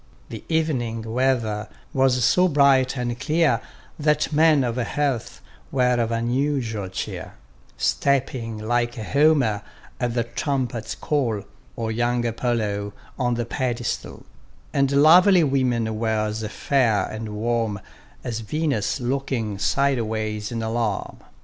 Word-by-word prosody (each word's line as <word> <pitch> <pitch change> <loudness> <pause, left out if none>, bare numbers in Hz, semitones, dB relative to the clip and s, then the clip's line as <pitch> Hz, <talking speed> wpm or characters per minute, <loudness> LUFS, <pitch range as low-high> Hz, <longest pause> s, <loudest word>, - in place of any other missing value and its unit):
The - - -8
evening 130 -9 0
weather 115 -3 0 0.2
was 130 -2 +3
so 180 +7 +4
bright, 140 -4 +3
and 120 -1 -3
clear, 160 +2 +2 0.4
That 150 +1 +1
men 155 -2 +5
of 120 -1 -2
health 130 0 -2 0.3
were 125 -2 +2
of 115 -1 0
unusual 120 -3 -1
cheer; 95 - -5 0.4
Stepping 125 - 0
like 120 +2 0
Homer 130 -2 +2 0.4
at 120 -2 -1
the 120 - +2
trumpet's 125 -2 -3
call, 120 -9 -1 0.3
Or 115 -1 -2
young 120 +1 0
Apollo 110 -4 -1 0.3
on 125 -2 +1
the 120 0 -2
pedestal: 120 0 -3 0.5
And 140 -1 +2
lovely 170 +6 +6
women 120 -6 0
were 110 -1 0
as 105 +1 -3
fair 115 -2 +1
and 110 -1 -6
warm, 115 -1 -1 0.4
As 115 -3 -3
Venus 135 -1 -1
looking 120 -5 -2
sideways 110 -2 0
in 115 -1 -3
alarm. 110 -2 -2
120 Hz, 120 wpm, -23 LUFS, 110-140 Hz, 0.5 s, lovely